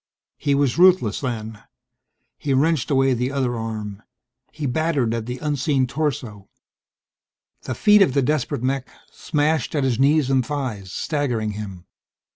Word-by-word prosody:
He 140 -1 +1
was 140 +1 +1
ruthless, 180 - +4
then. 110 -4 -4 0.8
He 140 -2 0
wrenched 150 0 +1
away 135 -2 +3
the 125 +2 -1
other 130 -3 -1
arm. 110 -3 -5 0.5
He 150 - -5
battered 140 -3 0
at 115 -1 -3
the 125 +1 -4
unseen 140 -1 0
torso. 125 -7 -3 1.1
The 130 - -5
feet 210 - +5
of 140 -9 +3
the 140 - +3
desperate 125 -4 -1
mech 135 +1 -1 0.2
smashed 150 -2 -1
at 145 - +1
his 130 -3 0
knees 140 0 +3
and 130 -1 +3
thighs, 120 -9 -4
staggering 125 -8 -1
him. 100 -4 -8
130 Hz, 145 wpm, -22 LUFS, 115-145 Hz, 1.1 s, feet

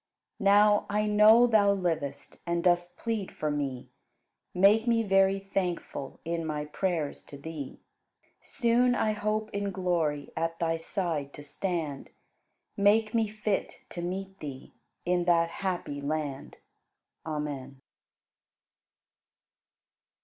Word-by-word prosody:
Now, 205 +1 +5
I 210 +1 +1
know 215 +3 +7
Thou 210 -4 +4
livest, 160 -7 -3
And 170 0 0
dost 175 0 +1
plead 225 -4 -3
for 155 -1 -2
me; 140 -4 -3 0.6
Make 205 +5 +4
me 230 -1 +3
very 195 -1 +3
thankful 185 -7 -4
In 165 0 -2
my 150 -2 -3
prayers 160 -1 -2
to 140 - -10
Thee. 145 -1 -7 0.6
Soon 245 +1 +2
I 215 - +1
hope 215 +1 -2
in 200 0 -1
glory 170 -6 -1
At 165 0 -2
Thy 165 -1 0
side 165 -5 -3
to 145 - -10
stand; 155 -2 -4 0.7
Make 215 +2 +3
me 225 -2 +2
fit 210 -1 -3
to 175 - -6
meet 190 +2 -5
Thee 140 -3 -8 0.3
In 175 0 +1
that 170 -1 +3
happy 175 -6 -3
land! 145 -2 -4 0.7
Amen. 145 -4 -5
180 Hz, 120 wpm, -29 LUFS, 155-205 Hz, 0.7 s, know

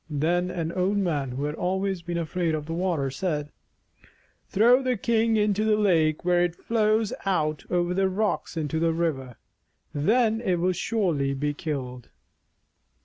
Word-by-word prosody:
Then 170 +5 0
an 165 -2 -3
old 190 +3 0
man 155 -9 0
who 130 +3 -4
had 150 0 -2
always 190 +2 -1
been 170 0 -4
afraid 170 0 -1
of 150 -1 -4
the 165 - -5
water 165 -6 -1
said: 150 -1 -3 1.0
"Throw 240 +6 +5
the 255 -2 0
thing 225 +1 +2
into 210 0 +1
the 215 -1 +3
lake 165 -7 +2
where 175 0 +3
it 175 -1 -1
flows 215 0 +1
out 155 -6 0
over 175 0 0
the 190 +1 +1
rocks 200 -2 -2
into 160 0 -1
the 165 0 +2
river. 140 -7 -2 0.6
Then 220 - +2
it 190 -6 +1
will 175 +2 +1
surely 170 -9 0
be 145 +2 -1
killed." 130 -6 -5
175 Hz, 160 wpm, -26 LUFS, 155-200 Hz, 1.0 s, Throw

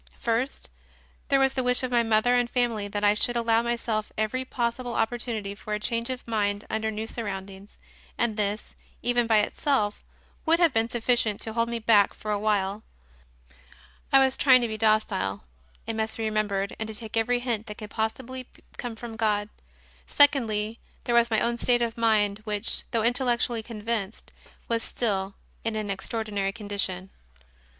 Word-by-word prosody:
First, 235 +4 -1 0.6
there 275 - +3
was 270 0 +3
the 260 - 0
wish 250 0 +2
of 255 - -2
my 240 -1 +4
mother 225 +1 +3
and 245 -1 +2
family 235 -5 0
that 205 0 -4
I 205 0 +6
should 240 +3 +1
allow 230 -1 +3
myself 235 -2 -2
every 220 +4 0
possible 245 -1 -2
opportunity 225 -3 -2
for 210 +1 -4
a - - -3
change 230 +2 -1
of 255 -2 -5
mind 205 -2 0
under 220 0 0
new 220 0 -3
surroundings, 200 -3 -7 0.4
and 235 -2 +1
this, 210 0 -2 0.3
even, 240 -1 +2
by 220 -1 +5
itself, 210 -2 0 0.4
would 330 +1 +4
have 340 -5 +4
been 225 +1 +1
sufficient 235 -3 +1
to 220 - -2
hold 230 0 +1
me 235 - -1
back 215 -3 +4
for 215 - -5
a 205 - 0
while. 205 -1 0 1.3
I 275 - +7
was 265 -1 +4
trying 255 -3 +6
to - - +1
be 220 - -4
docile, 215 - +1 0.4
it 225 0 -3
must 220 0 -2
be 225 - -3
remem 215 -1 +1
bered, 200 0 -2
and 220 - -3
to 220 - -5
take 220 +1 -6
every 225 +2 +2
hint 235 -3 -2
that 210 - -7
could 210 -2 -8
possibly 255 +3 -3 0.3
come 240 -2 -5
from 225 0 -8
God. 210 -2 0 0.6
Secondly, 230 -6 +3 0.2
there 240 - -1
was 235 0 +5
my 220 -2 +2
own 235 0 0
state 240 0 +3
of 230 -1 -2
mind, 215 -3 +2
which, 210 0 -3
though 230 -2 0
intellectually 240 -1 +1
convinced, 220 -2 -3 0.3
was 230 -1 0
still 195 -5 -1 0.3
in 225 -1 -2
an 210 -2 -2
extraordinary 205 -1 -2
condition. 200 -3 -2
225 Hz, 175 wpm, -26 LUFS, 210-240 Hz, 1.3 s, I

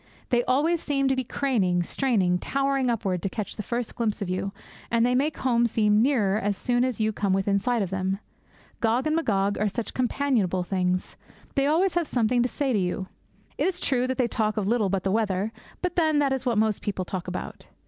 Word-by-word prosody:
They 245 -1 +3
always 310 +6 +2
seem 275 -2 0
to 265 - +2
be 260 - -1
craning, 205 -10 +1
straining, 190 -6 +1
towering 275 0 0
upward 195 -6 -1
to 195 - -1
catch 210 0 -5
the - - -4
first 235 +2 -3
glimpse 225 -3 -1
of 200 - -3
you; 190 +2 -2 0.4
and 230 0 +3
they 250 - +2
make 285 +5 +1
home 235 -2 +2
seem 210 -1 +3
nearer 220 -6 +2
as 205 -1 -1
soon 245 +2 +1
as 255 -3 -1
you 220 0 +1
come 200 -2 0
within 195 +1 +2
sight 240 +1 0
of 190 - -5
them. 190 0 -1 0.6
Gog 235 +4 +1
and 310 0 +1
Magog 205 -10 +1
are 210 0 +2
such 235 +2 -4
companionable 240 -8 +1
things. 185 0 -1 0.4
They 275 0 +2
always 340 +5 +2
have 345 -3 0
something 240 0 +2
to 245 - +1
say 275 -1 -1
to 210 - +2
you. 185 +1 -2 0.5
It - - +2
is 370 -2 -2
true 255 -2 +1
that 260 - -2
they 250 -3 +2
talk 215 -2 -1
of 210 - 0
little 215 -1 +1
but 190 -1 -1
the 195 - 0
weather; 210 -1 0 0.3
but 360 -1 -1
then, 315 -4 +3
that 280 -2 +2
is 260 -1 -3
what 235 -3 +1
most 215 -1 +1
people 190 -3 -3
talk 185 0 -5
about. 180 - -6
230 Hz, 220 wpm, -26 LUFS, 195-260 Hz, 0.6 s, They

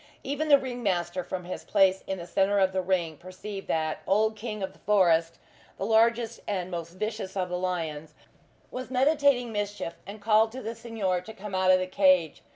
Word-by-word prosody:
Even 290 +3 -2
the 285 - +9
ring 255 -2 -5
master 180 -3 -1
from 180 +1 -5
his 180 - -6
place 190 -2 +3
in 190 - -2
the 170 - -7
centre 195 +3 +1
of 190 -1 +3
the 190 - +1
ring, 175 -4 -1
perceived 195 +3 -8
that 155 -1 -1
old 215 +3 +2
King 215 -2 -5
of 190 - -4
the - - -22
Forest, 170 -5 +3 0.4
the 195 - -3
largest 230 +1 +2
and 185 -3 -2
most 170 -1 -5
vicious 210 0 -4
of 180 -1 -1
the 180 - -2
lions, 160 -4 -3 0.6
was 255 0 -6
meditating 265 -2 +3
mischief, 205 -4 -3
and 205 +2 -8
called 220 +1 +3
to 260 - -6
the 225 - -4
Signor 220 -6 -2
to 220 +5 -10
come 205 -1 -8
out 185 0 +2
of 185 - +7
the 185 - -1
cage. 185 -4 +3
195 Hz, 200 wpm, -27 LUFS, 180-220 Hz, 0.6 s, the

